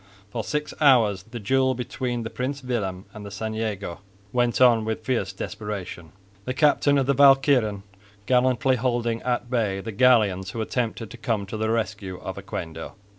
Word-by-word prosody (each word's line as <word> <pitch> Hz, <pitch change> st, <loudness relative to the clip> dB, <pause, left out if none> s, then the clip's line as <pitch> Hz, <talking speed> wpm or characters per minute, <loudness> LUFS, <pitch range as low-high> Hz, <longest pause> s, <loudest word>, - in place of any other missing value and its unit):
For 115 Hz, 0 st, -3 dB
six 150 Hz, +6 st, -3 dB
hours 115 Hz, -9 st, +5 dB
the 120 Hz, 0 st, -6 dB
duel 130 Hz, +4 st, +2 dB
between 120 Hz, 0 st, -3 dB
the 115 Hz, -, -6 dB
Prins 135 Hz, +2 st, -4 dB
Willem 100 Hz, -7 st, -3 dB
and 105 Hz, -, -9 dB
the 100 Hz, -, -7 dB
St 110 Hz, +2 st, -4 dB
Jago 105 Hz, -5 st, -4 dB, 0.3 s
went 120 Hz, -1 st, +1 dB
on 120 Hz, -3 st, +5 dB
with 110 Hz, 0 st, -4 dB
fierce 115 Hz, -7 st, 0 dB
desperation, 95 Hz, -4 st, -6 dB, 0.3 s
the 130 Hz, -, -3 dB
captain 145 Hz, -1 st, +3 dB
of 135 Hz, -, +2 dB
the 140 Hz, -, +2 dB
Walcheren 135 Hz, -7 st, +4 dB, 0.4 s
gallantly 130 Hz, +1 st, +2 dB
holding 120 Hz, -2 st, -1 dB
at 120 Hz, -1 st, -2 dB
bay 105 Hz, -6 st, 0 dB
the 110 Hz, +3 st, -6 dB
galleons 105 Hz, -5 st, +3 dB
who 110 Hz, +4 st, -4 dB
attempted 115 Hz, -1 st, -3 dB
to 120 Hz, -, -9 dB
come 110 Hz, -3 st, -1 dB
to 100 Hz, -, -7 dB
the 110 Hz, 0 st, -1 dB
rescue 105 Hz, -4 st, -2 dB
of -, -, -6 dB
Oquendo. 80 Hz, 0 st, -6 dB
115 Hz, 175 wpm, -24 LUFS, 105-125 Hz, 0.4 s, hours